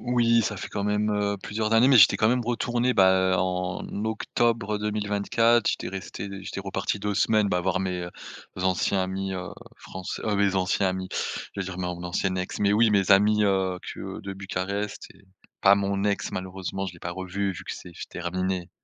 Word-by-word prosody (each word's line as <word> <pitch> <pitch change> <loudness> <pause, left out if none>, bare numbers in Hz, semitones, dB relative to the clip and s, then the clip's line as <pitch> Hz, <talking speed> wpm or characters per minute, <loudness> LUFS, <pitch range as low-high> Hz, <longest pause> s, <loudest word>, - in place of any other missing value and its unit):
Oui 115 -2 +3
ça - - -2
fait - - -6
quand 100 -1 -3
même, 105 +1 +1
heu, 105 -1 0
plusieurs 110 +1 -2
années. 115 +4 +6
Mais 135 - +7
j'étais 95 -5 +7
quand 110 - +3
même 125 -1 +1
retourné 120 +1 0
bah, 95 -1 +4
en 90 0 -1 0.2
octobre 110 -1 0
2024, 105 +2 +1
j'étais - - -1
resté 95 +1 -6
j'étais 95 - -5
reparti 95 +1 -2
2 105 0 -2
semaines 105 0 +3
bah, 90 -2 +1
voir 95 +1 0
mes 90 -2 -2 0.5
anciens 95 +1 +1
amis 95 +1 -3
heu, 90 0 -5 0.3
franç 95 -1 -7
heu, 105 -2 0
mes 100 -1 +2
anciens 95 +1 +1
amis, 95 0 -3 0.5
je 100 - -4
veux - - -2
dire 90 -1 -6
mon 90 -1 -3
ancienne 95 +1 -1
ex. 90 0 -3
Mais 100 0 +3
oui 110 +1 +4
mes 100 -2 +2
amis, 105 +2 +5
heu, 95 -2 +1
que - - -7
de 100 0 -6
Bucarest 100 +1 -4
et - - -21 0.4
pas 100 0 +7
mon 100 0 -1
ex 100 -1 0
malheureusement 95 +1 -4
je 90 - -6
l'ai 85 - -14
pas 85 - -4
revue, 95 +2 -2
vu - - -9
que - - -5
f - - -6 0.2
c'est - - -8
terminé. 90 +1 -2
100 Hz, 200 wpm, -26 LUFS, 95-105 Hz, 0.5 s, Mais